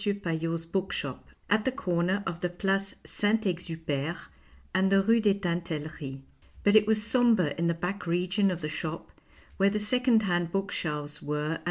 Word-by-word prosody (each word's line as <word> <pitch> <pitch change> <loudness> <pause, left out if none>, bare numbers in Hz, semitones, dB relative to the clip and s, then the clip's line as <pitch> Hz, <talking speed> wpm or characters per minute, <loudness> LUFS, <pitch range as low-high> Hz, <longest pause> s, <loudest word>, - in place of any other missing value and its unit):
Paillot's 165 -5 -1
bookshop, 170 -7 -3 0.2
at 210 +1 +3
the 260 - +1
corner 185 -4 0
of 170 0 -4
the 180 - 0
Place 195 +2 -1
Saint 215 +2 +1
Exupere 165 -3 -2 0.6
and 190 +1 +3
the 195 0 +5
Rue 230 +3 +4
des 205 -3 +3
Tintel 175 -4 -2
leries. 140 -3 -7 0.4
But 205 +1 +4
it 210 -1 +6
was 215 -1 +2
sombre 225 - +3
in 170 0 0
the 170 - +1
back 180 +3 -4
region 185 +4 +2
of 180 -2 -3
the 150 - -2
shop 155 +1 -5 0.5
where 195 0 +4
the 210 - -1
second 230 +1 +3
hand 175 -3 0
book 195 +1 -1
shelves 150 -2 -3
were 150 +1 -2
and - - 0
M. - - -17
180 Hz, 185 wpm, -28 LUFS, 165-205 Hz, 0.6 s, it